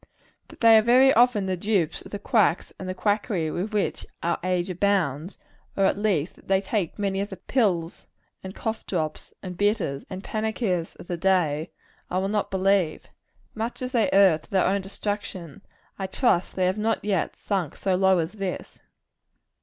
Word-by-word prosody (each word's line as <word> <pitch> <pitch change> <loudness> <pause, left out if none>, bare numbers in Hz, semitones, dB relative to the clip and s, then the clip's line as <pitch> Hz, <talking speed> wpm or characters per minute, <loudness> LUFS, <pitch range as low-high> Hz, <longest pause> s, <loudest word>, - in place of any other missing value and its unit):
That - - -16
they 225 -1 +8
are - - +3
very 255 +4 +5
often 235 -4 +4
the 190 -1 -1
dupes 180 -4 0
of - - -12
the 205 - -3
quacks 205 -4 +1
and 185 0 -5
quackery 205 -6 0
with 190 +7 -3
which 210 -2 -1 0.2
our 170 0 0
age 180 -1 0
abounds 180 -4 0 0.4
or 195 - +3
at - - +3
least, 190 -6 0
that - - -20
they 190 0 +3
take 195 -3 -2
many 195 -1 -1
of 200 - -3
the 190 - -8
pills, 185 -6 -1 0.4
and 190 +1 -8
cough 220 0 -3
drops, 155 -4 -3
and 180 -2 -6
bitters, 200 -8 0
and 190 +1 -6
panaceas 215 -6 -2
of - - -12
the 175 -1 -4
day 165 -4 +1 0.4
I 180 - -1
will 190 +1 0
not 210 0 -1
believe. 190 -3 +1 0.4
Much 230 +3 -4
as 250 - -3
they 235 -4 +2
err 190 -5 +5
to - - -22
their 190 -2 +2
own 195 +1 +1
destruction, 200 -3 -5 0.4
I 190 - -2
trust 190 -3 +1
they 185 - +1
have 185 +3 0
not 220 -1 0
yet 195 -5 0
sunk 190 -8 -2
so 190 - 0
low 190 0 +4
as 165 0 -1
this. 195 -4 -5
195 Hz, 185 wpm, -25 LUFS, 180-210 Hz, 0.4 s, they